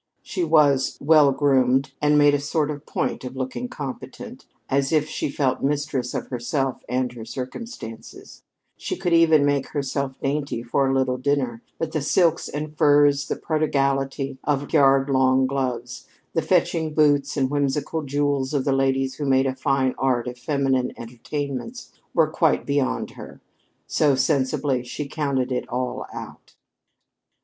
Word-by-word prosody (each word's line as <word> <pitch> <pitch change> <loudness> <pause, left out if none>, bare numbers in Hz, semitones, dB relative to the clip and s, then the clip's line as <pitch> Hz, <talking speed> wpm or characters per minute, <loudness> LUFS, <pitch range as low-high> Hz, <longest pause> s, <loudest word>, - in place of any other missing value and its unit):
She 185 -4 -3
was 150 -5 +3
"well 150 -1 +5
groomed" 135 -1 +2
and 150 0 +4
made 145 -1 +5
a 145 - +2
sort 150 +1 -1
of 145 0 -8
point - - -2
of 125 0 -7
looking 130 - -4
competent, 140 - -8 0.2
as 135 0 0
if 155 -1 +2
she 155 - -3
felt 140 -2 0
mistress 145 -2 -1
of - - -2
herself 130 +2 -2
and 125 0 0
her 120 -2 -9
circumstances; 125 - -8 0.3
she - - -4
could 180 -2 -1
even 160 -3 +5
make 140 -2 +1
herself 140 -2 -3
dainty 140 -4 -2
for 135 +3 +1
a 135 - +1
little 130 -1 0
dinner, 130 -4 -1 0.2
but 165 -1 -3
the 155 - -1
silks 165 +3 +2
and 150 +1 -5
furs, 145 -1 +4
the - - -1
prodigality 135 -3 -1
of 145 0 -1
yard 135 -2 +5
long 130 -1 +3
gloves, 125 -2 -3 0.3
the 165 - +1
fetching 165 -3 +1
boots 145 -2 +3
and 130 -1 +1
whimsical 145 +2 -1
jewels 145 -1 -1
of 135 - 0
the 140 - +2
ladies 135 -1 0
who 145 - -3
made 135 0 +3
a 130 - 0
fine 135 -1 +1
art 125 -3 +1
of 125 - -5
feminine 135 -2 0
entertainments, 140 - -6 0.2
were 160 -2 +4
quite 160 0 +1
beyond 140 - -1
her. - - -11 0.5
So, 145 -3 +2
sensibly, 130 -1 0
she 140 +4 -5
counted 140 -4 -1
it 125 - -2
all 125 0 -3
out. - - -10
140 Hz, 155 wpm, -23 LUFS, 130-150 Hz, 0.5 s, well